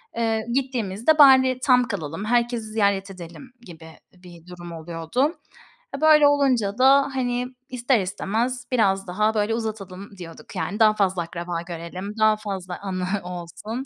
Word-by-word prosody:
Eee, 225 -1 -1
gittiğimizde, 250 0 0
"Bari 260 -3 +6
tam 250 -2 +4
kalalım, 165 -3 -5
herkesi 240 0 0
ziyaret 200 -2 0
edelim." 185 +8 -11
gibi 165 -7 -13 0.3
bir 180 -2 -16
durum 175 -1 -10
oluyordu. 165 - -2 0.6
E, - - -11
böyle 305 -2 +6
olunca 255 -8 +1
da, 275 +2 +5
hani, 250 -1 -1 0.2
ister 250 -1 +1
istemez 225 +6 -2
biraz 195 -6 +1
daha, 210 +4 0
böyle, 210 0 0
uzatalım 200 -4 -6
diyorduk. 170 +2 -11
Yani 185 +4 -3
daha 215 -1 +5
fazla 190 -3 0
akraba 170 0 -5
görelim, 175 +3 -7
daha 215 0 +4
fazla 190 -4 -6
anı 185 -2 -3 0.2
olsun. 180 +8 -7
210 Hz, 145 wpm, -23 LUFS, 180-245 Hz, 0.6 s, Bari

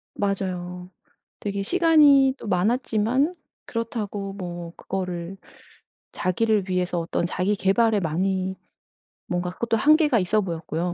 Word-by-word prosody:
맞아요. 180 -3 -3 0.5
되게 200 -1 -3
시간이 295 - +5
또 - - -9
많았지만 225 - +1 0.3
그렇다고 210 -4 -4
뭐 175 -3 -7
그거를 180 -1 -5 0.8
자기를 205 +1 0
위해서 180 -1 0
어떤 170 +1 -1
자기 185 +4 0
계발에 210 +3 +2
많이 190 +3 -1 0.7
뭔가 180 0 -2
그것도 230 +5 -1
한계가 300 -1 +4
있어 205 +3 +1
보였고요. 170 -1 -3
195 Hz, 275 characters per minute, -24 LUFS, 180-230 Hz, 0.8 s, 시간이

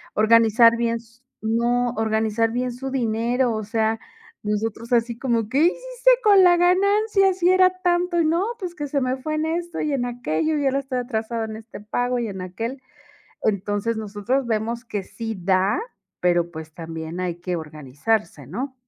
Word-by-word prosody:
Organizar 230 +1 +5
bien 230 0 0
s 230 +1 -18 0.2
no, 235 +2 +1
organizar 220 0 +1
bien 250 0 -2
su 265 +2 -6
dinero. 240 0 0
O 215 -1 -3
sea, 220 +1 0 0.4
nosotros 220 +3 -2
así 235 0 +1
como, 230 -4 0
¿qué 265 - -1
hiciste - - +2
con 405 -3 +7
la 355 -1 +7
ganancia 390 +2 +3
si 360 -1 +2
era 370 0 +6
tanto? 350 -1 +2
Y, - - +2
no, 335 +5 +2
pues 360 -3 -5
que 295 -2 -4
se 280 0 -1
me 255 +1 0
fue 310 +4 -4
en 310 +1 0
esto 340 +1 -3
y 300 - -1
en 245 -3 0
aquello 245 - -1
y 285 - -1
ahora 270 +1 +1
estoy 265 -2 -3
atrasado 230 -2 -3
en 220 0 -6
este 225 +1 -11
pago 245 +3 -1
y 235 - -2
en 190 -2 -6
aquel. 225 +9 -5 0.6
Entonces, 205 +2 0
nosotros 220 +5 -2
vemos 230 +2 -2
que 205 -4 -4
sí 225 +2 -6
da, 190 - +2 0.4
pero 175 -1 +2
pues 160 -1 -9
también 165 +1 -6
hay 180 -2 -2
que 180 -1 -2
organizarse, 150 - -3
¿no? 255 - -5
230 Hz, 180 wpm, -23 LUFS, 215-275 Hz, 0.6 s, con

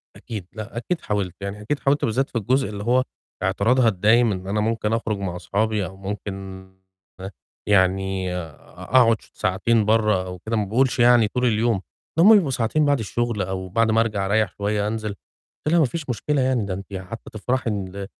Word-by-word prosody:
أكيد، 105 -6 -7
لأ، 110 +1 -8
أكيد 170 +8 -2
حاولت. 100 -4 -2
يعني 100 +1 -5
أكيد 140 +7 -2
حاولت 140 +2 +1
بالذات 130 +5 0
في 120 - -4
الجزء 130 +5 +1
اللي 105 -1 -6
هو 125 +3 +3 0.4
اعتراضها 115 +6 +2
الدايم 110 +3 +4
إن 95 -1 -5
أنا 105 +2 -1
ممكن 110 0 0
أخرج 110 -2 -1
مع 95 -3 -4
أصحابي 105 +2 -1
أو 95 - -9
ممكن، 95 -1 -6 0.6
هه 95 +2 -6 0.4
يعني 95 -1 +1
أ 80 -5 -6 0.3
أقعد 115 -3 +4
ش - - -21
ساعتين 105 +4 +1
برّه 105 -4 +2
أو 90 0 -7
كده 110 +5 -3
ما 105 -2 0
باقولش 125 +5 +1
يعني 120 -2 +6
طول 125 +4 -1
اليوم. 110 -3 +1 0.4
ده 165 - +5
هُم 220 - +9
بيبقوا 160 -10 +3
ساعتين، 130 +5 +1
بعد 145 -3 +2
الشغل 115 +1 -2
أو 95 0 -4
بعد 110 +3 +2
ما 115 +1 +4
أرجع 105 -4 -1
أريح 110 +2 +1
شوية 105 0 0
أنزل. 110 -1 -3 0.6
قُلت 155 - +1
لها 170 - +5
"مفيش 145 0 -2
مشكلة 135 +5 0
يعني 130 -5 +1
ده 95 - -3
أنتِ 100 +1 -8
حتى 95 +4 -7
تفرحي 125 +3 -1
إن 100 -1 -4
110 Hz, 195 wpm, -23 LUFS, 95-120 Hz, 0.6 s, هُم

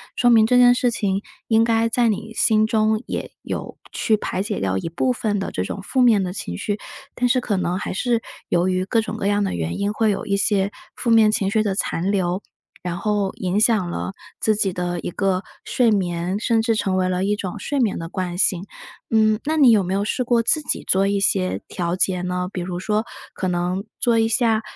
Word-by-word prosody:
说 245 - +3
明 220 -2 +6
这 250 - +4
件 245 0 +7
事 245 0 +1
情 200 -4 -1 0.3
应 225 0 +4
该， 230 0 +2
在 235 0 +2
你 220 +1 -3
心 215 -1 +3
中 220 0 +1
也 - - -5
有 - - -5
去 220 - +1
排 190 - -3
解 205 +1 -3
掉 95 0 0
一 165 - -4
部 250 +10 0
分 215 -4 -1
的 195 - -3
这 90 - -2
种 150 - -5
负 260 +5 0
面 225 -5 +5
的 180 -1 -3
情 85 - -5
绪。 205 - -3 0.3
但 245 0 0
是 255 +1 +3
可 235 -4 -1
能 180 -1 -1
还 200 - -4
是， 235 +4 +1 0.3
由 175 +1 +2
于 185 0 0
各 225 +3 +1
种 220 - -5
各 195 - -2
样 205 0 +2
的 - - -1
原 85 -1 -3
因， 205 +1 -1
会 220 0 +1
有 200 -1 -2
一 200 - 0
些 200 -1 +1 0.2
负 235 - -1
面 220 -2 +6
情 195 -2 0
绪 220 0 +2
的 200 -3 -1
残 190 -1 -1
留， 185 -1 0 0.4
然 175 -1 -4
后 205 -1 0
影 185 +2 -1
响 215 -5 +3
了 175 - -4 0.3
自 215 - +2
己 200 -3 0
的 175 -1 -2
一 - - -4
个 190 0 0 0.2
睡 240 -3 +2
眠， 180 -1 -1
甚 230 0 +2
至 225 0 +1
成 195 -3 0
为 185 0 +1
了 185 0 0
一 205 +1 +1
种 205 0 -5
睡 280 +8 -2
眠 225 -6 +1
的 165 0 -6
惯 180 -1 -4
性， 190 -1 +1 0.4
嗯， 215 -1 +3
那 315 +2 0
你 270 -5 +7
有 210 -3 +4
没 185 +1 -2
有 200 +1 0
试 235 +5 -1
过 240 -1 +2
自 310 +6 +2
己 295 - -2
做 195 +1 +3
一 200 0 +1
些 190 -1 +1
调 175 -2 -2
节 185 -1 0
呢？ 180 0 -2
比 180 - -4
如 175 0 -4
说， 210 +4 -1 0.3
可 185 - -3
能 180 +2 -1 0.2
做 235 -1 +2
一 225 - +3
下 225 -1 +2
205 Hz, 250 characters per minute, -22 LUFS, 185-225 Hz, 0.4 s, 件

